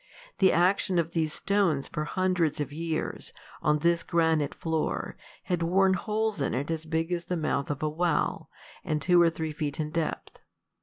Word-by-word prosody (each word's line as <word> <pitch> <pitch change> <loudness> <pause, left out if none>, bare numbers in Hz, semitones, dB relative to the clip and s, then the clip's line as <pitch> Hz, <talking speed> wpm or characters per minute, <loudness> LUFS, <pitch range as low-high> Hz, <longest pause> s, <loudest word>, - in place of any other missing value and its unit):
The 190 -1 +6
action 180 +1 +2
of 165 -1 +1
these 160 -2 0
stones 180 -7 +1
for 150 - -3
hundreds 180 -3 0
of 145 -1 -3
years, 160 0 -3 0.3
on 150 0 +3
this 170 +2 +2
granite 160 -3 +1
floor, 160 -1 -2 0.3
had 175 -2 -1
worn 190 +3 +3
holes 215 -1 -1
in 135 - 0
it 140 +5 -2
as 160 -1 -3
big 165 +1 -1
as 175 -1 -2
the 180 - -2
mouth 155 -3 -1
of 145 0 -3
a - - +2
well, 165 0 0 0.3
and 150 - -1
two 175 +4 +4
or 170 - +6
three 160 -1 -4
feet 150 -2 -3
in 150 -1 -2
depth. 165 -1 -3
165 Hz, 185 wpm, -28 LUFS, 155-180 Hz, 0.3 s, The